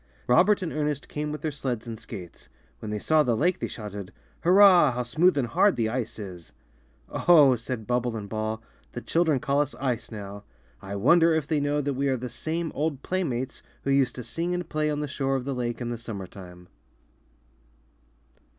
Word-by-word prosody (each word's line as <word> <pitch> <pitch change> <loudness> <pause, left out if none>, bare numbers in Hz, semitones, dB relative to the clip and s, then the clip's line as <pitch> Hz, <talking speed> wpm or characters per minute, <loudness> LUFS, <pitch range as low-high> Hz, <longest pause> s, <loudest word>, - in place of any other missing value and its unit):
Robert 185 +11 +4
and 170 - -3
Ernest 150 -2 -2
came 150 0 -4
with 150 -1 -5
their 155 - -1
sleds 125 -5 -3
and 115 -2 -7
skates. 90 -3 -10 0.3
When 110 - -6
they 105 - -2
saw 155 +8 +3
the 120 -6 +1
lake 180 +6 +1
they - - -2
shouted, 105 -4 -7 0.3
'^Hurrah! 180 -5 +7
how 125 - -1
smooth 155 +7 +3
and 135 - +2
hard 200 - +3
the 115 -2 0
ice 120 -1 -3
is!" 90 -5 -9 0.5
'^Oh!" 150 -7 +5
said 115 -1 -5
Bubble 120 0 0
and 105 -2 -6
Ball, 110 +1 -3 0.3
^'the 120 - -6
chil 170 +1 +2
dren 150 -5 +2
call 140 0 +1
us 145 -1 -3
ice 125 -4 -2
now. 100 -2 -8 0.4
I 100 +1 -6
wonder 165 - +5
if 160 -3 0
they 155 0 0
know 145 +1 0
that 140 0 -1
we 140 +2 -1
are 130 -1 +1
the 125 +1 -5
same 165 +5 -3
old 145 -2 -2
playmates 135 -9 -2 0.2
who 140 - 0
used 135 -2 +2
to 125 - -6
sing 170 +8 -2
and 180 -2 -4
play 155 -1 0
on 150 0 -1
the 150 - -2
shore 135 -1 -1
of 130 -2 -2
the 140 - -2
lake 120 -2 -3
in 120 -1 -3
the 120 - -4
summer 110 -5 -6
time." 90 -2 -12
135 Hz, 205 wpm, -26 LUFS, 115-155 Hz, 0.5 s, ^Hurrah